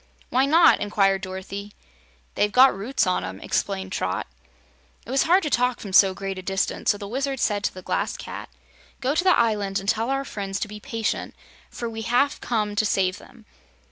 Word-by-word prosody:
"Why 260 Hz, +2 st, +3 dB
not?" 330 Hz, +3 st, +6 dB
inquired 195 Hz, -2 st, +1 dB
Dorothy. 195 Hz, +2 st, -7 dB, 0.6 s
"They've 210 Hz, -, +1 dB
got 260 Hz, 0 st, +6 dB
roots 225 Hz, +8 st, 0 dB
on 185 Hz, -1 st, 0 dB
'em," 95 Hz, -, -6 dB
explained 190 Hz, -, -2 dB
Trot. 90 Hz, -, -2 dB, 0.8 s
It -, -, -8 dB
was 270 Hz, -, +3 dB
hard 370 Hz, +3 st, +5 dB
to 300 Hz, -, -2 dB
talk 250 Hz, 0 st, +1 dB
from 200 Hz, -3 st, -8 dB
so 190 Hz, 0 st, +6 dB
great 195 Hz, -1 st, -5 dB
a -, -, -6 dB
distance, 195 Hz, +1 st, -1 dB
so 205 Hz, -, +3 dB
the 200 Hz, -1 st, -7 dB
Wizard 270 Hz, +4 st, -2 dB
said 205 Hz, -3 st, 0 dB
to -, -, -1 dB
the 185 Hz, -, -9 dB
Glass -, -, -2 dB
Cat: -, -, -8 dB, 0.5 s
"Go 265 Hz, +2 st, 0 dB
to 335 Hz, -, +1 dB
the 380 Hz, -, +4 dB
island 205 Hz, -4 st, +1 dB
and 195 Hz, -, -9 dB
tell 225 Hz, +3 st, +1 dB
our 275 Hz, 0 st, -1 dB
friends 195 Hz, -4 st, -4 dB
to -, -, -1 dB
be 210 Hz, 0 st, -9 dB
patient, 225 Hz, 0 st, -3 dB, 0.3 s
for 235 Hz, -, -5 dB
we 225 Hz, -1 st, -6 dB
have 245 Hz, +5 st, +1 dB
come 210 Hz, -3 st, -1 dB
to 220 Hz, -, +3 dB
save 190 Hz, -2 st, +1 dB
them. 230 Hz, -3 st, -17 dB
210 Hz, 205 wpm, -24 LUFS, 195-250 Hz, 0.8 s, not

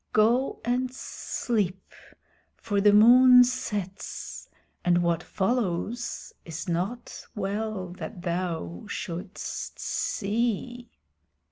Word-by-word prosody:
Go 235 Hz, +5 st, +3 dB
and 250 Hz, +1 st, 0 dB
sleep, 205 Hz, -6 st, -3 dB, 0.6 s
for 205 Hz, -3 st, -1 dB
the 205 Hz, +1 st, +6 dB
moon 250 Hz, +4 st, +8 dB
sets, 210 Hz, -6 st, -4 dB, 0.3 s
and 175 Hz, 0 st, +3 dB
what 170 Hz, -1 st, +1 dB
follows 220 Hz, +2 st, -2 dB
it -, -, -14 dB
is 165 Hz, +3 st, -5 dB
not 190 Hz, +8 st, -3 dB
well 205 Hz, -1 st, -2 dB
that 180 Hz, -5 st, -7 dB
thou 170 Hz, -, -3 dB
shouldst 180 Hz, +1 st, -5 dB
see." 235 Hz, +3 st, -2 dB
205 Hz, 95 wpm, -27 LUFS, 180-240 Hz, 0.6 s, moon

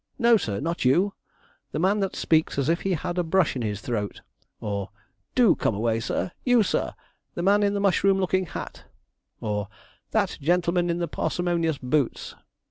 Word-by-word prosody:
no, 235 Hz, -2 st, +5 dB
sir, 105 Hz, -, -1 dB
not 170 Hz, +4 st, -2 dB
you 175 Hz, +11 st, +3 dB, 0.6 s
the -, -, -1 dB
man 190 Hz, +6 st, +2 dB
that 195 Hz, -1 st, -1 dB
speaks 160 Hz, -3 st, +1 dB
as 140 Hz, +1 st, +1 dB
if 170 Hz, -, +1 dB
he 195 Hz, -, 0 dB
had 175 Hz, +3 st, -3 dB
a -, -, +2 dB
brush 170 Hz, -1 st, +2 dB
in 125 Hz, -, -2 dB
his 105 Hz, -2 st, -3 dB
throat!' 105 Hz, -4 st, -3 dB, 0.4 s
or, 100 Hz, -2 st, -3 dB, 0.5 s
'Do 245 Hz, -6 st, +6 dB
come 110 Hz, -, -1 dB
away, 115 Hz, +2 st, 0 dB
sir! 145 Hz, -, -2 dB
you, 245 Hz, -3 st, +4 dB
sir! -, -, -1 dB, 0.4 s
the 175 Hz, -, -2 dB
man 200 Hz, +2 st, +4 dB
in 205 Hz, 0 st, +2 dB
the -, -, 0 dB
mushroom 195 Hz, 0 st, +3 dB
looking 185 Hz, -1 st, +1 dB
hat!' -, -, -7 dB, 0.6 s
or, 105 Hz, -1 st, -2 dB, 0.4 s
'that -, -, 0 dB
gentleman 175 Hz, +2 st, +2 dB
in 170 Hz, -, 0 dB
the 175 Hz, -1 st, -1 dB
parsimonious 170 Hz, -4 st, -1 dB
boots!' 130 Hz, +1 st, -1 dB
170 Hz, 180 wpm, -25 LUFS, 125-190 Hz, 0.6 s, Do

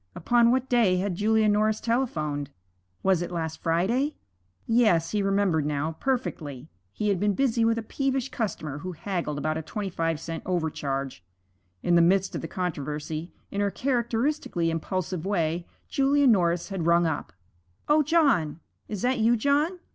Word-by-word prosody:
Upon 235 Hz, +6 st, +3 dB
what 260 Hz, +1 st, +1 dB
day 225 Hz, -8 st, +3 dB
had 190 Hz, +1 st, -1 dB
Julia 215 Hz, +3 st, +2 dB
Norris 215 Hz, +1 st, +2 dB
telephoned? 155 Hz, -, -1 dB, 0.5 s
Was 190 Hz, -3 st, +3 dB
it 175 Hz, -, -3 dB
last 160 Hz, -2 st, -4 dB
Friday? 215 Hz, -, +1 dB, 0.5 s
Yes, 215 Hz, -9 st, +3 dB
he 210 Hz, -, +1 dB
remembered 195 Hz, -5 st, +2 dB
now, 150 Hz, +1 st, -1 dB
perfectly. 165 Hz, -, -3 dB, 0.2 s
He 210 Hz, -, -1 dB
had 195 Hz, -3 st, +1 dB
been 205 Hz, 0 st, +1 dB
busy 240 Hz, -4 st, +2 dB
with 225 Hz, 0 st, +2 dB
a 230 Hz, -, -3 dB
peevish 270 Hz, +2 st, -1 dB
customer 155 Hz, -, -3 dB
who 185 Hz, +3 st, -5 dB
haggled 170 Hz, -4 st, -3 dB
about 155 Hz, +2 st, -1 dB
a -, -, -4 dB
twenty 195 Hz, +5 st, -5 dB
five 165 Hz, -2 st, -1 dB
cent 165 Hz, 0 st, -5 dB
overcharge. 140 Hz, -, -2 dB, 0.6 s
In 175 Hz, -, +2 dB
the 170 Hz, -, +6 dB
midst 190 Hz, +3 st, +3 dB
of -, -, -3 dB
the -, -, -5 dB
controversy, 155 Hz, -1 st, -4 dB, 0.2 s
in 200 Hz, -, -1 dB
her 200 Hz, -, +2 dB
characteristically 235 Hz, -, 0 dB
impulsive 180 Hz, +1 st, -3 dB
way, 170 Hz, -3 st, -1 dB, 0.2 s
Julia 280 Hz, +1 st, +2 dB
Norris 175 Hz, -7 st, +3 dB
had 185 Hz, -4 st, -2 dB
rung 170 Hz, 0 st, +4 dB
up: 160 Hz, -3 st, -2 dB, 0.6 s
'O 300 Hz, +1 st, +5 dB
John! 280 Hz, -, +2 dB, 0.3 s
is 210 Hz, -3 st, -5 dB
that 250 Hz, 0 st, +1 dB
you, 230 Hz, +2 st, +4 dB
John? 290 Hz, +9 st, +1 dB
190 Hz, 160 wpm, -26 LUFS, 165-235 Hz, 0.6 s, the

